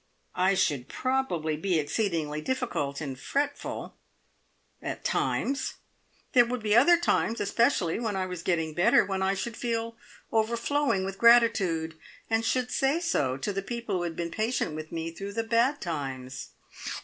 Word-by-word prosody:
"I 185 +2 +2
should 140 -8 +1
probably 255 -13 -1
be 175 +3 0
exceedingly 155 -2 -1
difficult 155 - -2
and 135 -4 -5
fretful. 285 - -3 0.8
At - - -5
times! 275 0 0 0.6
There 245 - +7
would 245 -2 -3
be 210 0 +3
other 340 +9 +7
times 240 -8 +1
especially 205 - +1
when 220 -4 -2
I 190 -1 0
was 180 -2 -5
getting 165 -3 0
better 175 +4 +4
when 195 -1 -2
I 190 +1 +1
should 225 +4 -4
feel 230 -1 -2 0.4
overflowing 230 0 +1
with 195 0 -5
gratitude, 195 -9 +4 0.3
and 225 0 +2
should 250 +2 0
say 275 +4 +2
so, 145 - 0
to 170 +10 -3
the 195 - -2
people 230 -2 -3
who - - -2
had 170 -2 -3
been 170 -1 -3
patient 220 -5 -1
with 155 0 -7
me 165 0 -3
through 200 +4 -7
the 225 +2 -1
bad 235 +5 +2
times!" 135 -6 -5
195 Hz, 160 wpm, -28 LUFS, 165-235 Hz, 0.8 s, There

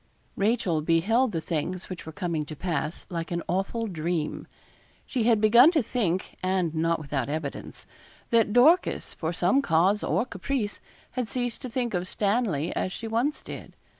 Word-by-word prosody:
Rachel 200 -6 +1
beheld 205 +11 +2
the 165 -4 -2
things 175 +3 -3
which 180 -3 -8
were - - -5
coming 170 -2 -2
to 155 - -8
pass 160 -1 -3
like 165 -1 -3
an 170 -1 -2
awful 195 +6 -1
dream. 170 -4 -3 0.6
She 245 -4 -1
had 230 -2 +4
begun 235 +7 +7
to 305 -6 +3
think, 195 -6 -1
and 185 -3 0
not 165 +1 +1
without 145 -2 -3
evidence, 150 -2 -5 0.5
that 230 -3 +4
Dorcas, 295 - +4
for 160 0 -3
some 180 +10 +2
cause 185 +1 +2
or 235 - +1
caprice, 250 -6 -3 0.3
had 250 -3 -2
ceased 245 0 -3
to 255 - -5
think 240 -1 -2
of 180 0 -1
Stanley 200 - 0
as 185 - -1
she 225 - -5
once 240 +7 0
did. - - -9
190 Hz, 165 wpm, -27 LUFS, 165-230 Hz, 0.6 s, begun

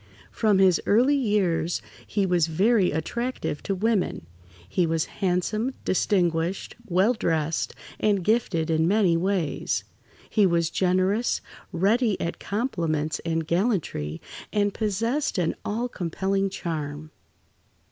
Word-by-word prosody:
From 215 -3 +2
his 190 -2 +4
early 245 +7 +4
years 200 - +1 0.3
he 200 -2 0
was 175 -3 +2
very 190 +4 +3
attractive 235 - -3
to 195 - -2
women. 200 - 0 0.4
He 175 - +1
was 160 0 0 0.2
handsome, 205 +7 0
distinguished, 175 -2 0
well 190 +5 +3
dressed, 160 -7 -1 0.2
and 205 -3 +2
gifted 180 -7 +1
in 160 0 +2
many 195 -3 +3
ways. 180 -3 -1 0.4
He 210 -3 +3
was 170 -2 +1
generous, 185 +5 +1 0.3
ready 210 +4 +2
at 170 - -3
compliments 165 - -1
and 165 -1 -2
gallantry, 170 - -1 0.3
and 205 -1 +1
possessed 230 +6 -1
an 170 -3 +1
all 230 +4 -1
compelling 195 0 -1
charm. 155 -4 -5
185 Hz, 115 wpm, -25 LUFS, 165-215 Hz, 0.4 s, his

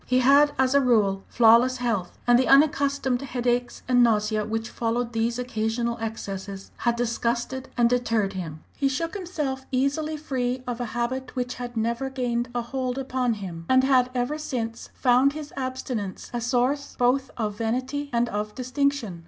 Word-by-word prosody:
He 255 - +2
had, 280 +3 +5
as 260 0 +2
a 280 - +5
rule, 210 -6 +2
flawless 240 +2 +5
health; 230 -8 -2
and 245 0 +5
the 260 - +2
unaccustomed 280 -2 +3
headaches 245 -2 -1
and 245 -1 +4
nausea 215 -2 +2
which 225 +1 -2
followed 235 +1 -2
these 230 +1 0
occasional 235 -1 -2
excesses 195 -3 -5
had 235 -1 +1
disgusted 240 +2 -2
and 240 -1 +5
deterred 230 -5 +1
him. 165 -5 -6
He 275 - +1
shook 330 +5 -2
himself 300 -9 -4
easily 285 +4 0
free 255 -4 -2
of 245 -1 -4
a - - -1
habit 255 +2 -2
which 250 -1 -2
had 245 -1 -7
never 235 +4 -1
gained 245 -2 -2
a 240 - 0
hold 255 +1 -3
upon 255 -3 0
him, 170 -5 -7
and 260 0 +5
had 255 -2 +4
ever 250 +5 -1
since 235 -6 -4
found 260 +2 +4
his 300 -1 -8
abstinence 255 -7 -4
a 240 - -2
source 255 +4 0
both 255 +2 +2
of 215 -3 -2
vanity 255 +5 -2
and 240 0 +1
of 210 0 -3
distinction. 255 - -1
245 Hz, 170 wpm, -25 LUFS, 230-265 Hz, -, had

